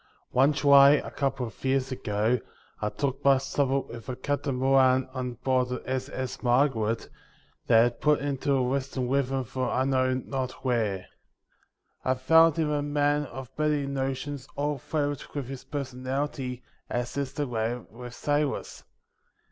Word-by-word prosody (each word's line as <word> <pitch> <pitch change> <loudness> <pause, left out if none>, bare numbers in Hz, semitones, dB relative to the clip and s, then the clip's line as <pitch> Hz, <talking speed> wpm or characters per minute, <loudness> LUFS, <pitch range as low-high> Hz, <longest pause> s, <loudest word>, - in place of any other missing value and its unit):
One 135 +4 +4
July 140 -1 +7
a - - -1
couple 135 -2 -1
of 115 - -11
years 135 0 +1
ago 110 0 0 0.4
I 105 - 0
took 135 +3 -3
my 140 -1 +6
supper 135 0 0
with 115 -1 -10
a 125 - -2
Captain 140 +1 -2
Moran 130 0 +4
on 125 -2 -3
board 125 +1 0
the 125 - -4
s.s. 130 0 -4
Margaret, 120 -3 +1 0.6
that 115 0 +6
had 120 0 -1
put 150 -1 +4
into 140 0 -1
a 130 -2 +2
western 130 0 -1
river 135 0 0
from 130 +2 -3
I 130 - +1
know 130 -1 +2
not 130 0 -4
where. 110 -7 0 1.0
I 130 - +2
found 160 +5 +5
him 155 -2 +1
a 145 -1 +1
man 145 0 +1
of 130 -3 -9
many 150 -2 +1
notions 135 0 -3
all 145 0 -1
flavoured 145 0 -2
with 140 -3 -2
his 135 -1 -8
personality, 130 -1 -4 0.3
as 120 0 -3
is 140 -2 -2
the 145 - -1
way 115 -2 -1 0.2
with 120 +2 -9
sailors. 145 -1 -1
130 Hz, 155 wpm, -27 LUFS, 125-140 Hz, 1.0 s, July